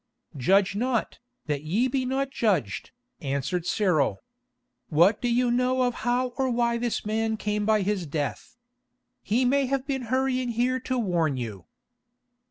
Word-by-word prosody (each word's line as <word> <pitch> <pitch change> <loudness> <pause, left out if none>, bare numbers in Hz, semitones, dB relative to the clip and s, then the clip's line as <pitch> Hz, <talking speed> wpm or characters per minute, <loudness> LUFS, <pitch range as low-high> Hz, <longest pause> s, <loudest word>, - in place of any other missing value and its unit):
"Judge 195 +8 +3
not, 240 +1 -1 0.3
that 145 -2 -2
ye 195 +12 +1
be 260 0 -1
not 270 +1 -1
judged," 165 - 0 0.3
answered 140 +6 -2
Cyril. 155 - +1 0.7
"What 170 +8 +4
do 245 - 0
you 245 0 +2
know 255 +1 +2
of 245 -1 +1
how 245 +2 +1
or 265 -1 +2
why 235 -1 +1
this 240 -2 -2
man 220 +1 0
came 210 0 -1
by 215 -2 +3
his 190 -4 -1
death? 145 - -4 0.6
He 240 +5 +1
may 275 +1 +2
have 270 0 -1
been 265 -3 -2
hurrying 255 -1 +1
here 245 +2 +1
to 255 - +1
warn 170 - +1
you." 105 -7 -6
225 Hz, 155 wpm, -26 LUFS, 175-255 Hz, 0.7 s, What